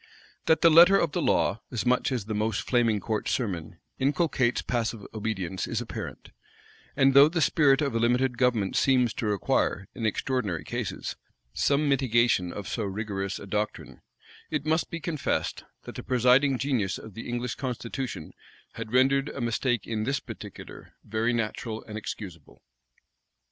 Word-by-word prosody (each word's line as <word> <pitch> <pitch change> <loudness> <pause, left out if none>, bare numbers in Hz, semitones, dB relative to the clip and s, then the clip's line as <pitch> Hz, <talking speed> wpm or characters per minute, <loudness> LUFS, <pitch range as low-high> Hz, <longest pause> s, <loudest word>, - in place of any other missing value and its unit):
That 160 - +4
the 165 - +6
letter 175 +5 +8
of 170 -5 +1
the - - -1
law, 100 +6 +1
as 120 -2 -2
much 125 +2 +2
as 120 -6 -2
the 110 - -4
most 105 0 -1
flaming 115 -4 +2
court 110 +1 -2
sermon, 90 -8 -3 0.2
inculcates 135 -3 +1
passive 115 -3 -2
obedience, 95 -5 -3
is - - -2
apparent; - - -7 0.6
and 135 0 +4
though 140 +2 +8
the 170 +1 -1
spirit 145 -2 +4
of 140 - -1
a 115 - +1
limited 125 +2 +2
government 120 -6 +1
seems 125 -4 +3
to 110 - -3
require, 100 -1 0
in 115 -4 -2
extraordinary 110 -6 -1
cases, - - -4 0.4
some 145 +1 +2
mitigation 120 -9 +2
of 100 +1 -7
so 115 - -3
rigorous 100 -1 -3
a - - -9
doctrine, 105 +2 -4 0.5
it 150 -2 -2
must 160 +2 +1
be 170 - -5
confessed, 155 -2 -2 0.2
that - - -9
the - - -6
presiding 130 +2 +3
genius 120 -7 -1
of 110 - -11
the 115 - -7
English 120 0 -2
constitution 125 - -5 0.4
had 115 -1 -7
rendered 135 +2 +3
a - - -7
mistake 120 0 0
in 110 -2 -2
this 135 +3 0
particular - - -10
very 110 +3 0
natural 115 -1 -3
and 105 - -9
excusable. 100 -5 -8
120 Hz, 160 wpm, -27 LUFS, 110-135 Hz, 0.6 s, letter